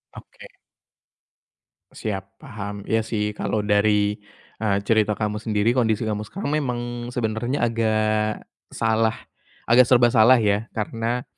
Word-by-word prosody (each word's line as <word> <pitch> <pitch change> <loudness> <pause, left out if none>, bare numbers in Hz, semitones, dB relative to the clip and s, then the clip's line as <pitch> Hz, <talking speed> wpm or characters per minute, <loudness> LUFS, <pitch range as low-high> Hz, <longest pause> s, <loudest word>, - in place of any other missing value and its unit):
Oke. - - -13 1.5
Siap, 100 -2 -6
paham. 105 -4 -7
Iya 110 0 +1
sih 110 -1 -2
kalau 110 - -2
dari, 105 0 +2 0.5
eee, 100 -3 +1
cerita 110 -2 +3
kamu 105 -1 -1
sendiri, 110 +2 +1
kondisi 110 -3 +1
kamu 105 -1 -2
sekarang 180 - -5
memang 120 -3 -4
sebenarnya 120 +3 -2
agak 110 -1 0 0.2
salah, 110 0 +1 0.5
agak 125 +2 +6
serba 120 -1 +6
salah 120 +2 +6
ya, 105 0 +1
karena, 115 +2 -3
110 Hz, 120 wpm, -23 LUFS, 105-120 Hz, 1.5 s, agak